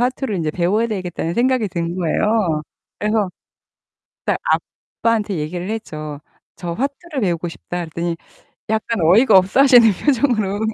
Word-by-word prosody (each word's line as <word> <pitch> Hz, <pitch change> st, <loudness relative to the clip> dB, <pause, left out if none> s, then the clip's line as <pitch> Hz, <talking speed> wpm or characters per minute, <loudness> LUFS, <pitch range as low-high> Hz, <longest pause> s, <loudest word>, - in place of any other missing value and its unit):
화투를 250 Hz, -3 st, -1 dB
인제 160 Hz, -3 st, -1 dB
배워야 185 Hz, +8 st, +1 dB
되겠다는 180 Hz, -5 st, -3 dB
생각이 250 Hz, -2 st, +2 dB
든 170 Hz, -1 st, -3 dB
거예요. 180 Hz, -2 st, +1 dB, 0.4 s
그래서 210 Hz, -2 st, +1 dB, 1.0 s
딱 -, -, +1 dB, 0.6 s
아빠한테 220 Hz, -4 st, +1 dB
얘기를 175 Hz, +5 st, -4 dB
했죠. 155 Hz, -9 st, -5 dB, 0.4 s
"저 175 Hz, -2 st, -5 dB
화투를 280 Hz, -, -3 dB
배우고 175 Hz, -3 st, 0 dB
싶다." 175 Hz, +1 st, -6 dB
그랬더니 170 Hz, +1 st, -3 dB, 0.6 s
약간 220 Hz, -1 st, -1 dB
어이가 205 Hz, +7 st, +6 dB
없어 190 Hz, +8 st, +2 dB
하시는 245 Hz, -4 st, +7 dB, 0.2 s
표정으로 230 Hz, -8 st, +2 dB
205 Hz, 330 characters per minute, -20 LUFS, 170-230 Hz, 1.0 s, 하시는